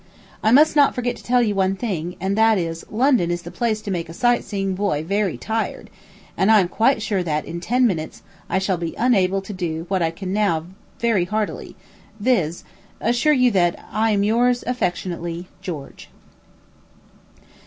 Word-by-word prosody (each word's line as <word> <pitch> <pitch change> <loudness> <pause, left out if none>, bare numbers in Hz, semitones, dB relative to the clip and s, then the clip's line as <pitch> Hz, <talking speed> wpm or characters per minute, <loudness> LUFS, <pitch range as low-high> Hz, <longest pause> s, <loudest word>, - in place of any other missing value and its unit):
I 215 - +2
must 300 +5 +6
not 285 -2 +4
forget 245 -1 -1
to - - -14
tell 245 0 +3
you 210 -3 +1
one 195 -1 +1
thing; 180 -6 -3
and 190 +2 -1
that 220 0 +4
is, 165 -2 -3
London 240 -6 +2
is 175 0 -2
the 175 - -8
place 225 -3 -1
to 205 - -4
make 170 -3 -3
a 165 - -9
sight 240 +3 +2
seeing 195 -2 -2
boy 185 -6 -1
very 200 +2 -1
tired, 225 0 -3 0.4
and 190 - +2
I 220 -1 +7
am 185 - +2
quite 225 +2 +2
sure 200 -4 0
that, 155 -3 -2
in 170 - -6
ten 245 +8 +2
minutes, 165 -8 -2 0.3
I - - +1
shall 190 -1 0
be 165 -1 -4
unable 195 -6 +2
to 205 - -7
do 165 -3 -3
what 190 -2 0
I 165 - +2
can 185 +3 -5
now 195 -7 +1 0.3
very 225 -7 +2
heartily, 215 +3 -3 0.4
viz., 195 -8 0 0.4
assure 245 +7 +2
you 250 -3 +4
that 175 -4 +2
I 220 +2 +1
am 205 -2 +2
yours, 240 +3 +2
affectionately, 175 -6 -3
GEORGE. 160 -8 -8
195 Hz, 185 wpm, -21 LUFS, 175-230 Hz, 0.4 s, I